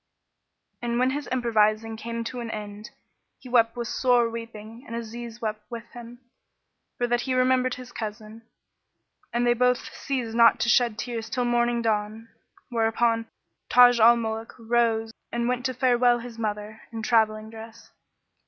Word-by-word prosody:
And 235 Hz, 0 st, -1 dB
when 255 Hz, +1 st, +2 dB
his 290 Hz, +1 st, -4 dB
improvising 225 Hz, -3 st, +1 dB
came 230 Hz, +1 st, -5 dB
to 245 Hz, +2 st, -5 dB
an 235 Hz, -1 st, -5 dB
end, 210 Hz, 0 st, -7 dB, 0.5 s
he -, -, -14 dB
wept 230 Hz, -1 st, +3 dB
with 240 Hz, -1 st, -4 dB
sore 245 Hz, -2 st, +2 dB
weeping 230 Hz, 0 st, -8 dB
and 230 Hz, -, -6 dB
Aziz 235 Hz, 0 st, -7 dB
wept 215 Hz, -1 st, -3 dB
with 235 Hz, -2 st, -6 dB
him, 240 Hz, 0 st, -11 dB, 0.8 s
for 245 Hz, -, 0 dB
that 240 Hz, 0 st, +1 dB
he 260 Hz, 0 st, -2 dB
remembered 255 Hz, 0 st, +2 dB
his 250 Hz, -1 st, -11 dB
cousin; 215 Hz, 0 st, -7 dB, 0.9 s
and 240 Hz, +1 st, 0 dB
they 240 Hz, -, +4 dB
both 250 Hz, 0 st, 0 dB
ceased 250 Hz, -5 st, -3 dB
not 230 Hz, 0 st, +5 dB
to 235 Hz, -, +1 dB
shed 240 Hz, -3 st, +3 dB
tears 225 Hz, 0 st, -4 dB
till 245 Hz, +2 st, -1 dB
morning 240 Hz, 0 st, +1 dB
dawned, 220 Hz, +1 st, -2 dB, 0.4 s
whereupon 230 Hz, -1 st, +1 dB, 0.4 s
Taj 245 Hz, -1 st, +7 dB
al 235 Hz, +2 st, +7 dB
Muluk 225 Hz, 0 st, -4 dB
rose 230 Hz, -1 st, +1 dB, 0.2 s
and 235 Hz, 0 st, -1 dB
went 250 Hz, +1 st, 0 dB
to 255 Hz, -, -4 dB
farewell 245 Hz, -1 st, +3 dB
his 235 Hz, -1 st, -9 dB
mother, 210 Hz, 0 st, -4 dB
in 225 Hz, -1 st, -6 dB
travelling 220 Hz, -2 st, +1 dB
dress. 225 Hz, +1 st, -12 dB
235 Hz, 160 wpm, -25 LUFS, 225-245 Hz, 0.9 s, Taj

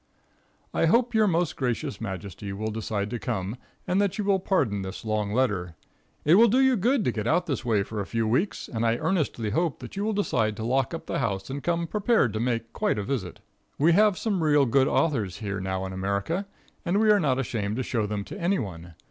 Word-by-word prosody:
I -, -, +2 dB
hope 235 Hz, +8 st, +3 dB
your 220 Hz, -1 st, +4 dB
most 170 Hz, -3 st, +1 dB
gracious 120 Hz, -5 st, -2 dB
majesty 100 Hz, -1 st, -6 dB
will 110 Hz, +2 st, -3 dB
decide 105 Hz, -1 st, -3 dB
to 120 Hz, -, -3 dB
come, 95 Hz, +2 st, -3 dB, 0.3 s
and 185 Hz, +2 st, +2 dB
that 200 Hz, -1 st, 0 dB
you 210 Hz, -, -1 dB
will 195 Hz, -1 st, +2 dB
pardon 130 Hz, -, 0 dB
this 95 Hz, +3 st, -7 dB
long 105 Hz, -2 st, -1 dB
letter. 105 Hz, -9 st, 0 dB, 0.5 s
It 155 Hz, -, +5 dB
will 225 Hz, +6 st, +7 dB
do 240 Hz, +4 st, +3 dB
you 265 Hz, -1 st, +5 dB
good 235 Hz, +3 st, +1 dB
to -, -, +2 dB
get 110 Hz, -1 st, -3 dB
out 180 Hz, +8 st, +2 dB
this 135 Hz, -7 st, -2 dB
way 110 Hz, -5 st, +2 dB
for 105 Hz, +1 st, -6 dB
a 100 Hz, -, -5 dB
few 115 Hz, -1 st, -1 dB
weeks, 135 Hz, -, 0 dB
and 115 Hz, -1 st, -3 dB
I 115 Hz, 0 st, +2 dB
earnestly 135 Hz, -, -1 dB
hope 165 Hz, +4 st, 0 dB
that 125 Hz, -, -10 dB
you 200 Hz, -, -2 dB
will 220 Hz, +1 st, 0 dB
decide 110 Hz, -, 0 dB
to 110 Hz, -, -4 dB
lock 130 Hz, +4 st, +1 dB
up -, -, -8 dB
the -, -, -2 dB
house 100 Hz, -4 st, -2 dB
and 140 Hz, +1 st, -4 dB
come 170 Hz, +1 st, 0 dB
prepared 210 Hz, -, +2 dB
to 110 Hz, -, -2 dB
make 115 Hz, -1 st, -2 dB
quite -, -, 0 dB
a 105 Hz, -, -1 dB
visit. 100 Hz, -7 st, -4 dB, 0.4 s
We 160 Hz, +4 st, +4 dB
have 210 Hz, +1 st, +4 dB
some 200 Hz, -6 st, -1 dB
real 150 Hz, -3 st, +4 dB
good 135 Hz, +2 st, +3 dB
authors 110 Hz, -, 0 dB
here 100 Hz, -2 st, -4 dB
now 95 Hz, 0 st, -2 dB
in 95 Hz, -, -5 dB
America, 100 Hz, -, -2 dB, 0.4 s
and 185 Hz, +3 st, +1 dB
we 215 Hz, -1 st, +5 dB
are 210 Hz, -, +5 dB
not 135 Hz, -7 st, +1 dB
ashamed 110 Hz, -5 st, -2 dB
to 130 Hz, -, -1 dB
show 115 Hz, -4 st, -1 dB
them 105 Hz, -1 st, -3 dB
to -, -, -9 dB
any 185 Hz, +4 st, +2 dB
one. 85 Hz, -, -6 dB
125 Hz, 230 wpm, -26 LUFS, -, 0.5 s, will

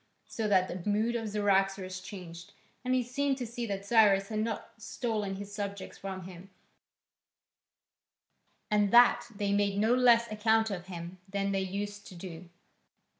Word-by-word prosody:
So 220 Hz, -2 st, -3 dB
that 185 Hz, -3 st, +3 dB
the 180 Hz, +3 st, -4 dB
mood 220 Hz, +3 st, +1 dB
of 225 Hz, -2 st, -2 dB
Cyaxares 195 Hz, -2 st, +1 dB
changed, 175 Hz, -3 st, -10 dB, 0.3 s
and 255 Hz, 0 st, +1 dB
he 255 Hz, -, +2 dB
seemed 275 Hz, +3 st, -1 dB
to 250 Hz, -, -3 dB
see 235 Hz, +1 st, -5 dB
that 200 Hz, -1 st, -4 dB
Cyrus 200 Hz, -3 st, +4 dB
had 215 Hz, -1 st, -2 dB
not 220 Hz, -1 st, -3 dB
stolen 215 Hz, -3 st, -2 dB
his 200 Hz, +1 st, -8 dB
subjects 200 Hz, -1 st, -5 dB
from 190 Hz, -1 st, -6 dB
him, 185 Hz, +1 st, -11 dB, 2.2 s
and 210 Hz, -1 st, +3 dB
that 240 Hz, +2 st, +6 dB
they 200 Hz, 0 st, 0 dB
made 200 Hz, -1 st, +1 dB
no 220 Hz, +3 st, +3 dB
less 235 Hz, -2 st, +5 dB
account 220 Hz, +1 st, +2 dB
of 180 Hz, -1 st, -5 dB
him 175 Hz, 0 st, -7 dB
than 200 Hz, 0 st, -1 dB
they 195 Hz, -1 st, 0 dB
used 205 Hz, +2 st, -4 dB
to 185 Hz, -, -11 dB
do. 170 Hz, -1 st, -9 dB
205 Hz, 160 wpm, -30 LUFS, 190-225 Hz, 2.2 s, that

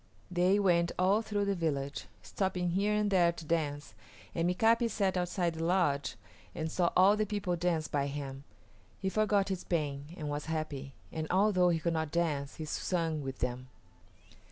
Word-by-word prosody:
They 180 Hz, +3 st, +3 dB
went 170 Hz, -4 st, +3 dB
all 195 Hz, +4 st, +3 dB
through 205 Hz, -2 st, -1 dB
the 200 Hz, -, +1 dB
village, 145 Hz, -6 st, -2 dB, 0.2 s
stopping 185 Hz, -2 st, -1 dB
here 200 Hz, +4 st, +1 dB
and 210 Hz, -1 st, +1 dB
there 175 Hz, -3 st, +4 dB
to 165 Hz, -, -9 dB
dance, 150 Hz, -3 st, -2 dB, 0.4 s
and 170 Hz, +1 st, +1 dB
Mika´pi 230 Hz, +5 st, +3 dB
sat 195 Hz, -4 st, 0 dB
outside 180 Hz, -1 st, 0 dB
the 160 Hz, 0 st, -4 dB
lodge 165 Hz, -5 st, +1 dB, 0.4 s
and 160 Hz, -1 st, -3 dB
saw 175 Hz, -2 st, +2 dB
all 190 Hz, +3 st, +7 dB
the 215 Hz, 0 st, 0 dB
people 200 Hz, -3 st, -1 dB
dance 170 Hz, -2 st, 0 dB
by 140 Hz, -1 st, 0 dB
him. 140 Hz, -1 st, -5 dB, 0.5 s
He 190 Hz, -, -2 dB
forgot 205 Hz, -1 st, +2 dB
his 190 Hz, -2 st, -3 dB
pain 150 Hz, -1 st, -2 dB
and 150 Hz, -, -4 dB
was 145 Hz, 0 st, -3 dB
happy, 145 Hz, -4 st, -4 dB, 0.2 s
and 160 Hz, -1 st, -3 dB
although 185 Hz, -1 st, +4 dB
he 170 Hz, -, +2 dB
could 170 Hz, +1 st, 0 dB
not 160 Hz, -2 st, -1 dB
dance, 150 Hz, -5 st, -1 dB
he 155 Hz, -, -5 dB
sung 165 Hz, -1 st, -1 dB
with 135 Hz, -1 st, -6 dB
them. 125 Hz, +1 st, -2 dB
170 Hz, 180 wpm, -32 LUFS, 150-190 Hz, 0.5 s, all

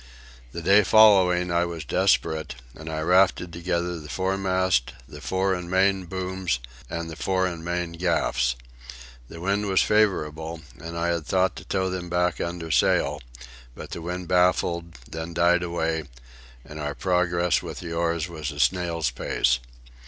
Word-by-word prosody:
The 85 Hz, -, -6 dB
day 100 Hz, +4 st, +6 dB
following 95 Hz, -4 st, +5 dB
I 85 Hz, 0 st, +2 dB
was 85 Hz, -3 st, -6 dB
desperate, 80 Hz, +1 st, +1 dB, 0.2 s
and 80 Hz, +3 st, -9 dB
I 80 Hz, 0 st, -3 dB
rafted 90 Hz, 0 st, +3 dB
together 85 Hz, 0 st, -2 dB
the 75 Hz, -1 st, -11 dB
foremast, 95 Hz, -5 st, 0 dB
the 75 Hz, +2 st, -11 dB
fore 95 Hz, +3 st, 0 dB
and 90 Hz, -1 st, -4 dB
main 95 Hz, 0 st, +2 dB
booms, 95 Hz, -3 st, -2 dB, 0.3 s
and 85 Hz, 0 st, -4 dB
the 80 Hz, -, -7 dB
fore 95 Hz, +3 st, 0 dB
and 85 Hz, -3 st, -4 dB
main 85 Hz, 0 st, -2 dB
gaffs. 80 Hz, -8 st, 0 dB, 0.7 s
The 85 Hz, -, -10 dB
wind 100 Hz, +4 st, 0 dB
was 95 Hz, -1 st, +3 dB
favourable, 80 Hz, -6 st, 0 dB, 0.2 s
and 85 Hz, +1 st, -7 dB
I 85 Hz, +1 st, 0 dB
had 85 Hz, -3 st, -2 dB
thought 95 Hz, 0 st, +2 dB
to -, -, -9 dB
tow 95 Hz, -1 st, -1 dB
them 90 Hz, -1 st, -5 dB
back 90 Hz, 0 st, 0 dB
under 85 Hz, -1 st, -4 dB
sail, -, -, +2 dB, 0.5 s
but -, -, -9 dB
the 85 Hz, -, -5 dB
wind 90 Hz, +1 st, -5 dB
baffled, 85 Hz, -2 st, +1 dB
then 80 Hz, +1 st, -6 dB
died 85 Hz, +1 st, +4 dB
away, 80 Hz, -2 st, -2 dB, 0.6 s
and 75 Hz, +1 st, -9 dB
our 75 Hz, -1 st, -3 dB
progress 90 Hz, -1 st, +1 dB
with -, -, -7 dB
the 85 Hz, -2 st, -6 dB
oars 85 Hz, 0 st, 0 dB
was 80 Hz, -4 st, -5 dB
a 75 Hz, -, -9 dB
snail's 85 Hz, 0 st, +1 dB
pace. -, -, +1 dB
85 Hz, 160 wpm, -25 LUFS, 80-95 Hz, 0.7 s, day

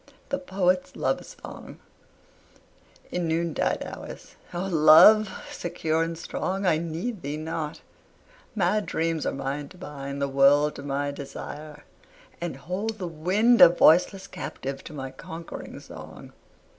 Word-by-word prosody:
THE 275 Hz, 0 st, -1 dB
POET'S 185 Hz, -7 st, 0 dB
LOVE -, -, 0 dB
SONG -, -, -11 dB, 1.3 s
In 175 Hz, -2 st, -1 dB
noon 165 Hz, 0 st, 0 dB
tide -, -, 0 dB
hours, -, -, -9 dB, 0.2 s
O 175 Hz, 0 st, -3 dB
Love, 190 Hz, +5 st, +7 dB, 0.2 s
secure 165 Hz, -2 st, -1 dB
and 165 Hz, 0 st, -2 dB
strong, 190 Hz, +3 st, -3 dB
I 160 Hz, -4 st, +3 dB
need 170 Hz, +6 st, -4 dB
thee 145 Hz, 0 st, -4 dB
not; 155 Hz, 0 st, -4 dB, 0.7 s
mad 205 Hz, +1 st, +1 dB
dreams 165 Hz, -1 st, -1 dB
are -, -, +1 dB
mine 140 Hz, +1 st, -4 dB
to 185 Hz, -, -15 dB
bind 140 Hz, -5 st, -6 dB
The 140 Hz, -, 0 dB
world 140 Hz, +2 st, +4 dB
to -, -, -7 dB
my 145 Hz, 0 st, -2 dB
desire, 145 Hz, +1 st, -8 dB, 0.6 s
and 175 Hz, -1 st, -3 dB
hold 205 Hz, +5 st, -4 dB
the 185 Hz, -, -4 dB
wind 190 Hz, +9 st, +3 dB
A -, -, +12 dB
voiceless 180 Hz, +3 st, +4 dB
captive 135 Hz, 0 st, -6 dB
to 155 Hz, -, -9 dB
my 135 Hz, -2 st, -6 dB
conquering 165 Hz, +5 st, -8 dB
song. -, -, -11 dB
165 Hz, 140 wpm, -26 LUFS, 145-185 Hz, 1.3 s, A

